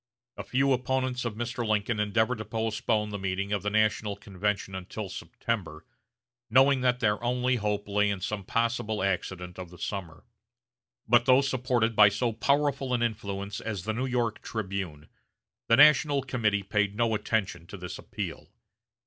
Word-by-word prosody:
A -, -, -6 dB
few 135 Hz, +1 st, +2 dB
opponents 130 Hz, 0 st, -1 dB
of 115 Hz, -3 st, -3 dB
Mr. 120 Hz, +1 st, -3 dB
Lincoln 110 Hz, 0 st, 0 dB
endeavored 110 Hz, +3 st, +1 dB
to 110 Hz, -, -5 dB
postpone 110 Hz, -1 st, -1 dB
the 100 Hz, -, -4 dB
meeting 95 Hz, +1 st, -2 dB
of 100 Hz, -, 0 dB
the 105 Hz, -, -1 dB
national 110 Hz, -1 st, +1 dB
convention 100 Hz, -1 st, -3 dB
until 95 Hz, +2 st, -6 dB
September, 85 Hz, -7 st, -4 dB, 0.6 s
knowing 135 Hz, +2 st, +5 dB
that 125 Hz, -1 st, +1 dB
their 105 Hz, 0 st, +1 dB
only 125 Hz, +1 st, +1 dB
hope 105 Hz, -1 st, -2 dB
lay 105 Hz, 0 st, +2 dB
in 100 Hz, -1 st, -2 dB
some 100 Hz, +2 st, -3 dB
possible 115 Hz, -1 st, -1 dB
accident 90 Hz, -1 st, -3 dB
of 90 Hz, -2 st, -7 dB
the 90 Hz, -, -13 dB
summer. 90 Hz, -3 st, -5 dB, 0.8 s
But 120 Hz, +1 st, +4 dB
though 130 Hz, +1 st, +6 dB
supported 125 Hz, -4 st, 0 dB
by 105 Hz, -1 st, +8 dB
so 110 Hz, +4 st, -1 dB
powerful 140 Hz, +2 st, +1 dB
an 120 Hz, -, 0 dB
influence 100 Hz, -3 st, -3 dB
as 105 Hz, -6 st, -4 dB
the 110 Hz, -, -2 dB
New 130 Hz, +4 st, -2 dB
York 120 Hz, -3 st, -1 dB
"Tribune," 95 Hz, -8 st, -5 dB, 0.6 s
the 115 Hz, -, +6 dB
National 145 Hz, -1 st, +6 dB
Committee 110 Hz, -6 st, 0 dB
paid 105 Hz, 0 st, 0 dB
no 115 Hz, 0 st, +1 dB
attention 100 Hz, -6 st, -1 dB
to 100 Hz, -, -8 dB
this 90 Hz, -1 st, -7 dB
appeal. -, -, -6 dB
110 Hz, 165 wpm, -28 LUFS, 100-125 Hz, 0.8 s, by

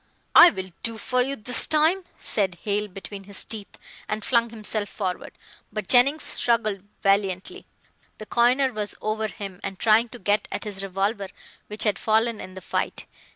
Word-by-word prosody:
"I'll 345 Hz, -1 st, +9 dB, 0.3 s
do 230 Hz, -1 st, -1 dB
for 250 Hz, +3 st, 0 dB
you 270 Hz, +2 st, -1 dB
this 250 Hz, +2 st, 0 dB
time," 320 Hz, +5 st, +3 dB
said 190 Hz, -4 st, -1 dB
Hale 210 Hz, 0 st, 0 dB
between 195 Hz, +1 st, -9 dB
his 200 Hz, -1 st, -2 dB
teeth, 215 Hz, -3 st, -8 dB, 0.3 s
and 215 Hz, 0 st, -3 dB
flung 235 Hz, -2 st, +2 dB
himself 215 Hz, -2 st, -2 dB
forward, 185 Hz, -3 st, -4 dB, 0.4 s
but 215 Hz, -3 st, -4 dB
Jennings 275 Hz, +7 st, +5 dB
struggled 215 Hz, -5 st, +1 dB, 0.2 s
valiantly. 195 Hz, -2 st, 0 dB, 0.5 s
The 215 Hz, -, -8 dB
coiner 250 Hz, +4 st, +3 dB
was 210 Hz, -1 st, -2 dB
over 215 Hz, 0 st, -1 dB
him, 195 Hz, -3 st, -8 dB
and 195 Hz, -1 st, -4 dB
trying 225 Hz, +3 st, +4 dB
to 245 Hz, -, -10 dB
get 205 Hz, -1 st, +1 dB
at -, -, -3 dB
his 205 Hz, -3 st, -4 dB
revolver 195 Hz, +2 st, -1 dB, 0.4 s
which 210 Hz, +1 st, -2 dB
had 210 Hz, -2 st, +1 dB
fallen 225 Hz, +1 st, +1 dB
in 185 Hz, -, -9 dB
the 190 Hz, -, -8 dB
fight. -, -, -2 dB
215 Hz, 165 wpm, -25 LUFS, 200-235 Hz, 0.5 s, I'll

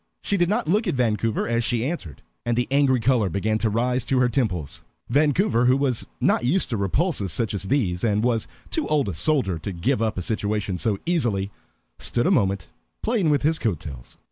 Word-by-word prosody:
She 200 Hz, -, 0 dB
did 175 Hz, -2 st, +2 dB
not 205 Hz, -, 0 dB
look 210 Hz, +7 st, +2 dB
at 175 Hz, -, 0 dB
Vancouver 115 Hz, -3 st, 0 dB
as 115 Hz, 0 st, +1 dB
she 120 Hz, 0 st, 0 dB
answered, 130 Hz, -, -5 dB, 0.2 s
and 120 Hz, -1 st, -1 dB
the 125 Hz, -, +1 dB
angry 140 Hz, -2 st, +3 dB
color 115 Hz, -4 st, +2 dB
began 110 Hz, +4 st, 0 dB
to 110 Hz, -, +1 dB
rise 125 Hz, +3 st, 0 dB
to 135 Hz, -, +1 dB
her 125 Hz, -1 st, +3 dB
temples. 95 Hz, -, -2 dB, 0.3 s
Vancouver, 145 Hz, -, +2 dB
who 130 Hz, +2 st, +4 dB
was 135 Hz, -4 st, 0 dB
not -, -, +2 dB
used 140 Hz, +4 st, +1 dB
to 115 Hz, -, 0 dB
repulses 100 Hz, -, 0 dB
such 115 Hz, +5 st, -1 dB
as 100 Hz, -1 st, -4 dB
these, 95 Hz, -8 st, 0 dB
and 105 Hz, -2 st, +1 dB
was 115 Hz, -2 st, +1 dB, 0.2 s
too 320 Hz, -, -1 dB
old 145 Hz, -7 st, +1 dB
a -, -, -3 dB
soldier 95 Hz, -, +1 dB
to 100 Hz, -, -5 dB
give 115 Hz, +9 st, 0 dB
up 110 Hz, -3 st, 0 dB
a 90 Hz, -, -2 dB
situation 105 Hz, -2 st, -1 dB
so 110 Hz, -4 st, 0 dB
easily, 115 Hz, -, 0 dB, 0.5 s
stood 120 Hz, -, 0 dB
a 185 Hz, -, +3 dB
moment 100 Hz, -, +1 dB, 0.3 s
playing 215 Hz, -8 st, +1 dB
with 145 Hz, -2 st, +2 dB
his 160 Hz, +2 st, +2 dB
coat 100 Hz, -, -1 dB
tails. 65 Hz, -5 st, -10 dB
120 Hz, 210 wpm, -24 LUFS, 100-140 Hz, 0.5 s, who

